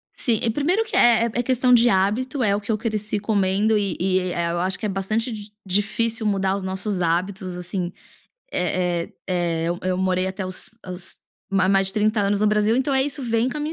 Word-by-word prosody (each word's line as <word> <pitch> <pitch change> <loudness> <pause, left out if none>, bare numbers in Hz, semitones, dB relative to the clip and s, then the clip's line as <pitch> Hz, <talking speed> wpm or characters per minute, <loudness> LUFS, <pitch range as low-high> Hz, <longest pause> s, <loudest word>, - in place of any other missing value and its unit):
Sim, 230 -4 +1
e 230 - +3
1º 340 - +1
que 440 - -5
é 230 -1 +5
é 245 - 0
questão 250 0 +2
de 240 0 +6
hábito, 235 +8 +1
é 200 -2 +3
o - - -1
que 205 - -3
eu 215 - +1
cresci 215 -1 -2
comendo 205 +1 +1
e 200 -4 0
e, 185 +1 +2
eh 185 -1 -2 0.2
eh, - - -1
eu 170 - -2
acho 185 +2 0
que - - -4
é 210 - 0
bastante 215 +5 -1
di 210 -1 -8
difícil 220 +4 0
mudar 195 -2 +1
os 200 - -4
nossos 190 0 -2
hábitos 185 +2 -1
assim. 180 0 -3 0.6
Eh 180 -1 0
eh - - -22
eh, 175 -3 -1
eu 175 +1 -2
eu 185 0 0
morei 185 0 +1
até 190 0 -4
os 185 0 -3 0.2
os 180 0 -7 0.3
ma 195 -2 +2
mais 195 0 +3
de - - -1
30 215 +1 +2
anos 200 0 +1
no 215 - +3
Brasil, 210 +1 +2
então 265 +2 0
é 265 0 +4
isso 285 0 -3
vem 230 0 +1
com 260 - -5
a - - -3
minha 300 +2 -3
200 Hz, 235 wpm, -22 LUFS, 185-230 Hz, 0.6 s, de